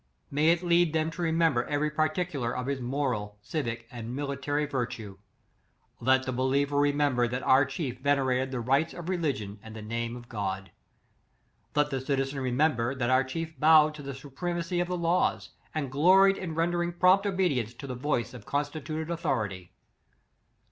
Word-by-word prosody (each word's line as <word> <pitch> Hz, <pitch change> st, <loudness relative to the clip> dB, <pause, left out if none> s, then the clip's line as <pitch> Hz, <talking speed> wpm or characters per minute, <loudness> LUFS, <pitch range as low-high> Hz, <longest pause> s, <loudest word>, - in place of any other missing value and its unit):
May 150 Hz, +3 st, +2 dB
it 170 Hz, +1 st, +3 dB
lead 170 Hz, -2 st, +3 dB
them 160 Hz, 0 st, +1 dB
to 175 Hz, -, -7 dB
remember 165 Hz, -6 st, +2 dB
every 150 Hz, +1 st, 0 dB
particu 155 Hz, +1 st, -1 dB
lar 120 Hz, 0 st, -1 dB
of 125 Hz, -, -3 dB
his 140 Hz, -1 st, -2 dB
moral, 120 Hz, -6 st, -2 dB
civic, 115 Hz, -1 st, -4 dB
and 120 Hz, 0 st, -6 dB
military 145 Hz, +1 st, -1 dB
vir 130 Hz, -5 st, -1 dB
tue. 100 Hz, -5 st, -9 dB, 0.8 s
Let 130 Hz, +2 st, +3 dB
the 130 Hz, -, -3 dB
believer 135 Hz, +3 st, +1 dB
remember 145 Hz, -4 st, +2 dB
that 125 Hz, +2 st, -3 dB
our 135 Hz, +2 st, +5 dB
chief 130 Hz, -2 st, -4 dB
venerated 130 Hz, -2 st, +1 dB
the 130 Hz, -2 st, -3 dB
rites 135 Hz, +7 st, +1 dB
of 175 Hz, 0 st, -6 dB
religion 135 Hz, -, -2 dB
and 110 Hz, 0 st, -11 dB
the 110 Hz, -, -7 dB
name 115 Hz, +2 st, -3 dB
of 120 Hz, 0 st, -12 dB
God. 95 Hz, -4 st, -4 dB, 1.0 s
Let 150 Hz, 0 st, +2 dB
the 135 Hz, -1 st, -1 dB
citizen 135 Hz, 0 st, -1 dB
remem 130 Hz, +4 st, +2 dB
ber, 120 Hz, +3 st, -1 dB
that 130 Hz, -1 st, 0 dB
our 130 Hz, +1 st, +4 dB
chief 160 Hz, +2 st, -5 dB
bowed 155 Hz, 0 st, +6 dB
to 150 Hz, -, -9 dB
the 140 Hz, -1 st, -6 dB
suprema 170 Hz, +6 st, -4 dB
cy 175 Hz, +1 st, -3 dB
of 175 Hz, 0 st, +1 dB
the 180 Hz, 0 st, -2 dB
laws, 170 Hz, +1 st, +1 dB, 0.2 s
and 140 Hz, -4 st, -2 dB
gloried 190 Hz, +7 st, +5 dB
in 165 Hz, -4 st, -5 dB
rendering 175 Hz, +1 st, 0 dB
prompt 185 Hz, +3 st, +4 dB
obedience 145 Hz, -, 0 dB
to 140 Hz, -, -9 dB
the 130 Hz, -, -4 dB
voice 125 Hz, -2 st, -1 dB
of 125 Hz, -, -10 dB
consti 145 Hz, +2 st, -2 dB
tuted 155 Hz, +3 st, -4 dB
authority. 105 Hz, -, -2 dB
140 Hz, 180 wpm, -28 LUFS, 125-160 Hz, 1.0 s, bowed